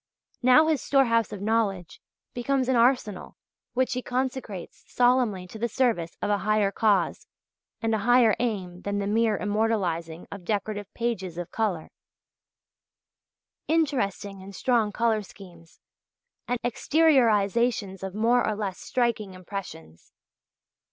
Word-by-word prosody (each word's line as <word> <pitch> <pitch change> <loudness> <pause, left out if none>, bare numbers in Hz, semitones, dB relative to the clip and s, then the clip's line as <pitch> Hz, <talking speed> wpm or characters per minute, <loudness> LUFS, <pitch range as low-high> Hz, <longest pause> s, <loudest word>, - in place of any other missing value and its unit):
Now 255 +5 +6
his 315 -4 +1
storehouse 230 -5 +2
of 200 -1 -6
knowledge 205 -5 -1 0.3
becomes 260 +1 0
an 260 - +2
arsenal 235 -5 +1 0.4
which 255 +1 +1
he 250 - -2
consecrates 250 -7 -4
solemnly 245 -7 +2
to 200 +5 -10
the 235 +2 -1
service 225 -10 0
of - - 0
a 205 - +2
higher 215 -1 +1
cause 200 -4 +1 0.6
and 225 0 +1
a 220 - +1
higher 240 0 +4
aim 190 -7 -3
than 200 +1 -2
the 200 - -1
mere 215 0 +2
immortalizing 190 -6 -1
of 200 -3 -8
"decorative 205 +1 -3
pages 190 -8 -3
of 175 -1 -6
colour" 200 -8 -2 1.8
"interesting 205 - -1
and 195 +1 -10
strong 235 -5 +1
colour 225 -1 +1
schemes" 175 -4 -15 0.7
and 245 - 0
"exteriorisations 235 - +2
of 190 0 -6
more 235 +3 +3
or 215 - 0
less 200 -3 -4
striking 230 -6 -1
impressions." 180 - -9
215 Hz, 130 wpm, -26 LUFS, 195-245 Hz, 1.8 s, Now